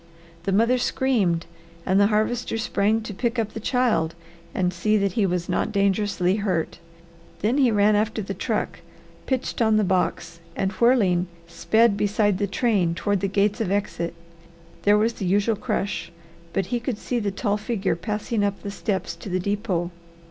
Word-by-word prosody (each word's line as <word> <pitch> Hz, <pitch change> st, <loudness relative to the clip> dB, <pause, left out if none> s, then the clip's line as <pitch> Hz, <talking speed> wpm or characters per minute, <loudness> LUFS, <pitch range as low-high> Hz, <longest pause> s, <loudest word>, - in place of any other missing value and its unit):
The 195 Hz, -, 0 dB
mother 230 Hz, +6 st, +3 dB
screamed 205 Hz, -11 st, +1 dB, 0.4 s
and 190 Hz, +1 st, +3 dB
the 200 Hz, -, +6 dB
Harvester 225 Hz, +2 st, 0 dB
sprang 220 Hz, -1 st, +1 dB
to 215 Hz, -1 st, -6 dB
pick 235 Hz, +4 st, -1 dB
up 220 Hz, -2 st, -1 dB
the -, -, -5 dB
child 225 Hz, -9 st, +1 dB, 0.4 s
and 180 Hz, 0 st, 0 dB
see 215 Hz, +5 st, +2 dB
that 200 Hz, -1 st, +1 dB
he 200 Hz, +1 st, +1 dB
was 180 Hz, -1 st, -1 dB
not -, -, 0 dB
dangerously 200 Hz, -2 st, +1 dB
hurt. 185 Hz, -6 st, -1 dB, 0.6 s
Then 235 Hz, +7 st, +2 dB
he 260 Hz, -3 st, +5 dB
ran 210 Hz, -1 st, +4 dB
after 215 Hz, +1 st, 0 dB
the 195 Hz, -, -4 dB
truck, -, -, -2 dB, 0.5 s
pitched 260 Hz, -2 st, -1 dB
on 220 Hz, -1 st, +4 dB
the 215 Hz, -, +3 dB
box, 180 Hz, -3 st, -1 dB, 0.2 s
and 190 Hz, 0 st, 0 dB
whirling, 195 Hz, -5 st, +3 dB, 0.2 s
sped 205 Hz, +6 st, +2 dB
beside 205 Hz, -1 st, +1 dB
the 205 Hz, -, +1 dB
train 195 Hz, -6 st, +1 dB
toward 205 Hz, +2 st, 0 dB
the 195 Hz, -, 0 dB
gates 200 Hz, +2 st, +1 dB
of 210 Hz, -, -1 dB
exit. 180 Hz, -4 st, -2 dB, 0.7 s
There 205 Hz, 0 st, +4 dB
was 225 Hz, +2 st, +2 dB
the 195 Hz, -, -5 dB
usual 205 Hz, +4 st, +2 dB
crush, 200 Hz, -6 st, -3 dB, 0.4 s
but 195 Hz, -, 0 dB
he 240 Hz, -, +2 dB
could 240 Hz, -1 st, -3 dB
see 245 Hz, +2 st, -2 dB
the 205 Hz, -3 st, -1 dB
tall 200 Hz, +1 st, -1 dB
figure 210 Hz, -4 st, -1 dB
passing 210 Hz, +4 st, -2 dB
up 200 Hz, -1 st, -2 dB
the 200 Hz, -, -4 dB
steps 200 Hz, -4 st, -2 dB
to 180 Hz, -, -8 dB
the 185 Hz, 0 st, 0 dB
depot. 190 Hz, -3 st, -1 dB
205 Hz, 175 wpm, -24 LUFS, 190-220 Hz, 0.7 s, the